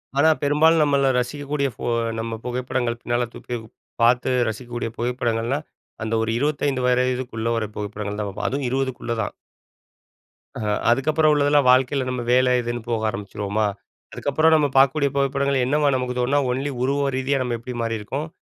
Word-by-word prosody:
ஆனா, 150 +3 +5
பெரும்பாலும் 155 +3 +4
நம்மள 140 -2 +2
ரசிக்கக்கூடிய 140 +2 -2
ஃபோ - - -5 0.3
நம்ம 115 0 -3
புகைப்படங்கள். 125 -1 -2
பின்னால 120 0 0
தூக்கிப் 120 -2 -6 0.4
பார்த்து 125 +2 +3 0.2
ரசிக்கக்கூடிய 120 +1 -5
புகைப்படங்கள்லாம். 120 +3 -1 0.4
அந்த 110 +1 -3
ஒரு 115 - -1
25 140 -1 0
வயதுக்குள்ள 125 -2 0
வர 110 - -1
புகைப்படங்கள் 105 0 -4
தான் 105 - -2
பார்போம். 95 - -3
அதுவும் 135 -1 -1
20க்குள்ள 130 -2 -2
தான். 100 - -3 1.2
ஆஹா, 105 -2 -1 0.2
அதுக்கப்புறம் 155 +5 +3
உள்ளதெல்லாம் 145 -1 +3
வாழ்க்கையில, 130 +1 +2
நம்ம 125 -1 -2
வேலை 125 0 +4
இதுன்னு 120 0 -3
போக 110 -2 0
ஆரம்பிச்சிருவோமா. 105 +1 -2 0.5
அதுக்கப்புறம் 155 +3 +2
நம்ம 150 -2 +3
பார்க்கக்கூடிய 140 +1 +4
புகைப்படங்கள். 140 -1 +1
என்னவா, 145 +2 +2
நமக்கு 125 -1 -2
தோணுனா, 135 +4 +2
ஒன்லி 135 +3 -2
உருவம் 140 +1 +1
ரீதியா 135 +1 0
நம்ம 120 -2 -2
எப்படி 125 +1 -7
மாறியிருக்கோம்? 115 +7 -3
125 Hz, 145 wpm, -23 LUFS, 120-140 Hz, 1.2 s, ஆனா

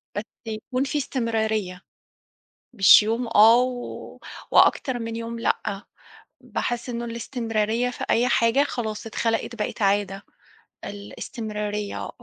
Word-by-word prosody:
بس 205 - -2 0.2
يكون 245 +4 -3
في 295 +2 -2
استمراريّة. 220 -8 -1 0.9
مش 200 -1 +8
يوم 230 +3 -1
آه، 225 +1 +7
و 250 -1 -5 0.3
وأكتر 255 -3 +4
من 230 0 -4
يوم 230 0 -5
لأ. 200 -2 -1 0.6
باحِس 240 0 -3
إنه 235 0 -3
الاستمراريّة 230 -1 -1
في 250 - -6
أي 240 +2 +3
حاجة 235 +2 +3
خلاص، 225 -6 -4
اتخلِقت، 230 +1 -1
بقِت 210 0 -4
عادة. 195 0 +1 0.6
الاستمراريّة 210 0 -5
230 Hz, 115 wpm, -24 LUFS, 210-240 Hz, 0.9 s, مش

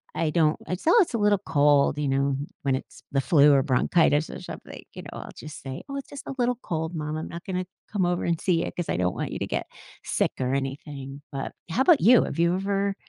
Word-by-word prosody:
I 160 - +1
don't 155 -2 +3
I - - -2
s 180 - -5
"Oh, 345 - +6
it's 345 - 0
a 230 - +1
little 205 -1 +3
cold," 145 -1 +4
you 145 -2 0
know, 135 0 +1 0.3
when 135 -2 +2
it's 130 - -8
the 135 - +3
flu 145 +2 +5
or 135 - +4
bronchitis 150 +3 +2
or - - -7
something, - - -9
you - - -8
know. - - -8
I'll - - -8
just 155 0 -9
say, 135 -1 -6
"Oh, 275 - -4
it's 275 - -7
just 285 - -9
a 270 - -5
little 245 -1 +1
cold, 160 0 -3
mom. 150 0 -3
I'm 160 - -5
not 170 +1 -8
gonna 185 -1 -2 0.3
come 200 -4 +1
over 175 0 0
and 170 -2 0
see 170 -3 +2
you - - -4
'cause 175 - -4
I - - 0
don't 90 0 0
want - - -3
you - - -4
to - - -2
get - - -2 0.4
sick - - 0
or 130 +1 0
anything." 135 0 -4
But 135 -1 -4 0.2
how 230 +11 +2
about 330 0 +5
you? 240 +5 +7
Have - - -5
you 170 +1 +3
ever 195 +1 0
160 Hz, 255 wpm, -26 LUFS, 140-190 Hz, 0.4 s, you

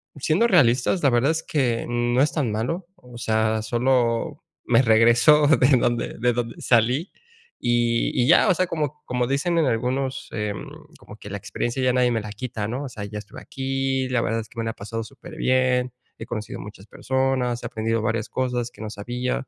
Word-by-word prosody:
siendo 155 - +2
realistas, 140 - +3
la 140 - +5
verdad 125 +5 +3
es 160 - -3
que 125 -6 0
no 120 +1 +1
es 145 - +3
tan 140 -8 -1
malo, 165 - -3
o 125 -9 -14
sea, 110 -1 0
solo 125 +5 0 0.2
me 120 +1 +4
regreso 120 +6 +5
de 145 -4 +5
donde 120 -1 -1
de 120 +1 +2
donde 115 -1 -4
salí 125 - +2 0.5
y 120 -1 +1
y - - +1
ya, 170 +7 +6
o - - +6
sea, 185 +1 0
como 150 -3 -3
como 125 0 -1
dicen 140 +6 0
en 165 - +3
algunos, 130 +2 -1
em, 105 -3 -4 0.3
como 105 - -12
que 105 - -10
la 100 - -4
experiencia 120 +6 -3
ya 125 -1 +3
nadie 125 -1 +3
me 115 - 0
la 105 0 -7
quita, 115 -3 -4
¿no? 125 +6 -4
O 140 - -5
sea, 105 -4 -7
ya 105 +1 -7
estuve 105 - -11
aquí, 135 -1 -2
la 125 -2 +1
verdad 115 0 -1
es 110 - -12
que 115 - -10
me 115 - -1
la 115 - -1
ha - - -11
pasado 115 +3 -5
superbien, 130 -2 -1 0.3
he - - -6
conocido 110 -2 -6
muchas 100 -1 -10
personas, 130 -2 -1
he - - -5
aprendido 115 -1 -1
varias 110 0 -2
cosas 125 -2 -2
que - - -14
no 110 - -5
sabía 125 +5 -3
125 Hz, 205 wpm, -23 LUFS, 115-135 Hz, 0.5 s, ya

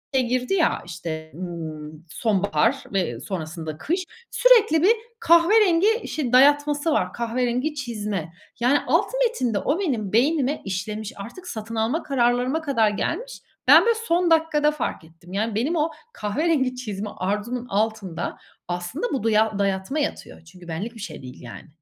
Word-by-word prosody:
şey 260 - +4
girdi 250 +8 0
ya, 350 -4 +2
işte, 160 -2 -6
ımm, 160 -3 -7
sonbahar 190 -9 +1
ve, 185 -8 +1
ııı, 120 +1 -8
sonrasında 160 -3 -5
kış, 350 - -2 0.3
sürekli 445 -10 +5
bir 395 - +6 0.3
kahverengi 380 +5 +4
şey 260 -6 -3
dayatması 290 +3 +4
var, 185 -11 0
kahverengi 245 +5 -1
çizme. 210 - -4 0.3
Yani, 255 +5 +3
alt - - +3 0.2
metinde 250 - 0
o 295 - 0
benim 235 - -2
beynime 280 +3 +2
işlemiş, 205 +3 -4
artık 245 - -9
satın 225 -6 -6
alma 230 +9 0
kararlarıma 250 +3 +1
kadar 265 -8 +2
gelmiş. - - -3 0.3
Ben, - - +9
böyle, 465 -1 +3
son 340 0 +2
dakikada 310 -2 +3
fark 290 - -4
ettim. 165 +3 -15
Yani, 215 +2 -1
benim 270 +10 0
o 320 0 +1 0.2
kahverengi 260 +4 0
çizme 210 -4 -5
arzumun 210 +6 -2
altında 210 -4 -2 0.3
aslında 180 - -3
bu 260 - -1
duya 220 -2 +2
dayatma 195 +8 -1
yatıyor. 290 - -4
Çünkü 175 +1 -15
benlik 195 +9 -5
bir - - -11
şey 165 -7 -7
değil, 125 -1 -11
yani. 120 +5 -10
235 Hz, 150 wpm, -24 LUFS, 190-300 Hz, 0.3 s, Ben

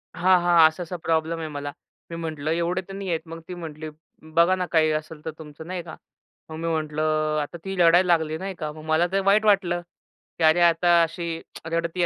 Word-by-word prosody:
हां, 180 +1 +4
हां. 170 -2 +7
असा-असा 175 +2 -5
प्रॉब्लेम 165 0 0
आहे 160 - -4
मला. 145 -1 -5 0.4
मी 165 - -6
म्हटलं, 155 -2 -3
"एवढे 170 +2 0
तर 195 - -9
नाही 195 -1 -5
आहेत." 165 0 -2
मग 165 0 -8
ती 180 - -6
म्हटली, 155 -2 -7 0.5
"बघा 170 +3 +5
ना 180 -1 -2
काही 160 -2 +4
असेल 155 0 -4
तर 160 - -3
तुमचं, 155 +1 -11
नाही 180 -2 -4
का?" - - -9 0.5
मग 155 - -7
मी 165 - -3
म्हटलं, 155 -1 -2 0.4
अ, - - +1
आता 160 +4 -6
ती 195 - -4
रडायला 175 +2 +5
लागली, 160 -1 0
नाही 190 +2 -5
का. 155 -1 -3
मग 155 0 -11
मला 160 +2 +2
तर 195 - +2
वाईट 210 +2 +4
वाटलं. 185 -4 +2 0.6
की 165 - 0
अरे 160 +2 +5
आता 170 +1 +3
अशी 165 +1 -4 0.5
रडतीये 170 +1 0
165 Hz, 215 wpm, -24 LUFS, 155-175 Hz, 0.6 s, हां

